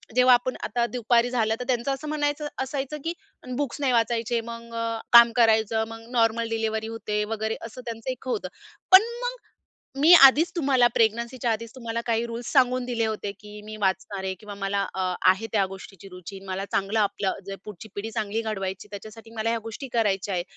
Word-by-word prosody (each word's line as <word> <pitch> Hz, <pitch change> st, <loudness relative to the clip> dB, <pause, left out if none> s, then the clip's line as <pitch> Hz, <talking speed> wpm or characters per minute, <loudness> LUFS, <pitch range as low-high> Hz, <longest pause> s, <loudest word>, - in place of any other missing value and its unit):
जेव्हा 250 Hz, 0 st, +6 dB
आपण 245 Hz, +1 st, +1 dB
आता 240 Hz, -1 st, 0 dB
दुपारी 240 Hz, 0 st, +2 dB
झालं 225 Hz, -3 st, +1 dB
तर -, -, -3 dB
त्यांचं 255 Hz, +1 st, 0 dB
असं 290 Hz, +3 st, -7 dB
म्हणन 295 Hz, 0 st, -1 dB, 0.2 s
असायचं 275 Hz, +2 st, -4 dB
की 330 Hz, -, -2 dB, 0.4 s
बुक्स 290 Hz, -1 st, -3 dB
नाही 270 Hz, -2 st, +2 dB
वाचायचे. 230 Hz, 0 st, +1 dB
मग 235 Hz, 0 st, -9 dB, 0.4 s
काम 235 Hz, 0 st, +9 dB
करायचं, 220 Hz, -1 st, +3 dB
मग 225 Hz, 0 st, -10 dB
नॉर्मल 230 Hz, -1 st, +2 dB
डिलिव्हरी 220 Hz, -1 st, -1 dB
होते 210 Hz, -2 st, -2 dB
वगैरे 220 Hz, 0 st, -2 dB
असं 230 Hz, +2 st, -9 dB
त्यांचं 230 Hz, +1 st, -5 dB
एक 255 Hz, +1 st, -9 dB
होतं. 220 Hz, -7 st, -2 dB, 0.4 s
पण 375 Hz, +1 st, +11 dB, 0.2 s
मग -, -, -2 dB, 0.7 s
मी 320 Hz, +5 st, +7 dB
आधीच 300 Hz, +2 st, +8 dB
तुम्हाला 270 Hz, -6 st, +4 dB
प्रेग्नन्सीच्या 235 Hz, +2 st, +1 dB
आधीच 230 Hz, +1 st, -4 dB
तुम्हाला 230 Hz, -2 st, -4 dB
काही 230 Hz, 0 st, +1 dB
रुल्स 235 Hz, +1 st, -6 dB
सांगून 255 Hz, -2 st, +3 dB
दिले 235 Hz, -2 st, -1 dB
होते 215 Hz, -2 st, -3 dB
की 210 Hz, 0 st, -11 dB
मी 215 Hz, 0 st, -8 dB
वाचणार 190 Hz, 0 st, -1 dB
आहे. 190 Hz, 0 st, -2 dB
किंवा 210 Hz, -1 st, -8 dB
मला 200 Hz, 0 st, -1 dB
अ, 185 Hz, -1 st, -1 dB, 0.2 s
आहे 195 Hz, +4 st, -1 dB
त्या 205 Hz, -3 st, +3 dB
गोष्टीची 195 Hz, 0 st, -11 dB
रुची, 180 Hz, +1 st, -10 dB
मला 190 Hz, +1 st, -3 dB
चांगलं 200 Hz, +3 st, 0 dB
आपलं 200 Hz, -1 st, 0 dB
जे 195 Hz, -, -5 dB
पुढची-पिढी 210 Hz, +2 st, -7 dB
चांगली 220 Hz, -1 st, -2 dB
घडवायची 195 Hz, -2 st, -4 dB
त्याच्यासाठी 215 Hz, +2 st, -10 dB
मला 220 Hz, +1 st, 0 dB
ह्या 230 Hz, -, 0 dB
गोष्टी 225 Hz, +5 st, -7 dB
करायच्या 200 Hz, -4 st, 0 dB
आहे. 175 Hz, -, 0 dB
225 Hz, 185 wpm, -25 LUFS, 210-245 Hz, 0.7 s, पण